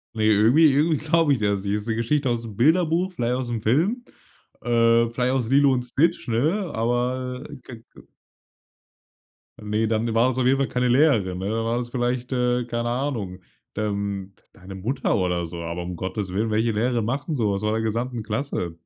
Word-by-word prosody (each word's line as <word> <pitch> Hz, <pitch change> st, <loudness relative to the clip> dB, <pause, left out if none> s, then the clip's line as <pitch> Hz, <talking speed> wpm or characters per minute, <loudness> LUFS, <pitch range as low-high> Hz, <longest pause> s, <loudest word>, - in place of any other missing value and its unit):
Ne, 110 Hz, -, -1 dB
irgendwie 115 Hz, +9 st, +5 dB
irgendwie 155 Hz, +2 st, +2 dB
glaube 155 Hz, 0 st, +2 dB
ich 125 Hz, -, -1 dB
das 100 Hz, -2 st, 0 dB
nicht. 100 Hz, 0 st, -1 dB
Ist 105 Hz, +2 st, -5 dB
'ne 110 Hz, -, 0 dB
Geschichte 130 Hz, +4 st, 0 dB
aus'm 115 Hz, -3 st, -3 dB
Bilderbuch, 165 Hz, -, +2 dB
vielleicht 120 Hz, -4 st, -1 dB
aus'm 120 Hz, -3 st, -3 dB
Film, 175 Hz, -, +1 dB, 0.6 s
äh, 115 Hz, -1 st, +3 dB
vielleicht 125 Hz, +2 st, 0 dB
aus 125 Hz, -3 st, -1 dB
„Lilo 140 Hz, 0 st, +5 dB
und 125 Hz, -1 st, -1 dB
Snitch“, 150 Hz, +7 st, 0 dB
ne, 155 Hz, -, 0 dB
aber 125 Hz, +3 st, -1 dB, 0.2 s
geg 115 Hz, -2 st, -11 dB
ge -, -, -15 dB, 1.6 s
Ne, 105 Hz, +1 st, -1 dB
dann 110 Hz, +1 st, 0 dB
war's 125 Hz, +3 st, +2 dB
auf 125 Hz, -, +1 dB
jeden 135 Hz, +1 st, +4 dB
Fall 135 Hz, -, +1 dB
keine 125 Hz, 0 st, 0 dB
Lehrerin, 120 Hz, -, +2 dB
ne? 95 Hz, +2 st, -3 dB
Dann 115 Hz, +1 st, -1 dB
war's 120 Hz, +1 st, -2 dB
vielleicht, 125 Hz, 0 st, -2 dB
äh, 125 Hz, -1 st, +1 dB
keine 120 Hz, 0 st, -2 dB
Ahnung, 120 Hz, -8 st, -3 dB, 0.4 s
ähm, 100 Hz, -2 st, -3 dB
d -, -, -27 dB
deine 95 Hz, +2 st, -11 dB
Mutter 120 Hz, +8 st, -1 dB
oder 90 Hz, -3 st, -1 dB
so, 85 Hz, -, -8 dB
aber 85 Hz, +1 st, -4 dB
um 90 Hz, 0 st, -5 dB
Gottes 95 Hz, +2 st, -4 dB
Willen, 110 Hz, +3 st, -1 dB
welche 110 Hz, +2 st, +1 dB
Lehrerin 115 Hz, 0 st, 0 dB
macht 135 Hz, +4 st, -3 dB
'n 155 Hz, -, -1 dB
so 110 Hz, -5 st, +1 dB
was 100 Hz, +1 st, -2 dB
vor 105 Hz, 0 st, 0 dB
der 110 Hz, 0 st, 0 dB
gesamten 115 Hz, +2 st, -2 dB
Klasse? 105 Hz, -, -3 dB
120 Hz, 190 wpm, -23 LUFS, 105-130 Hz, 1.6 s, irgendwie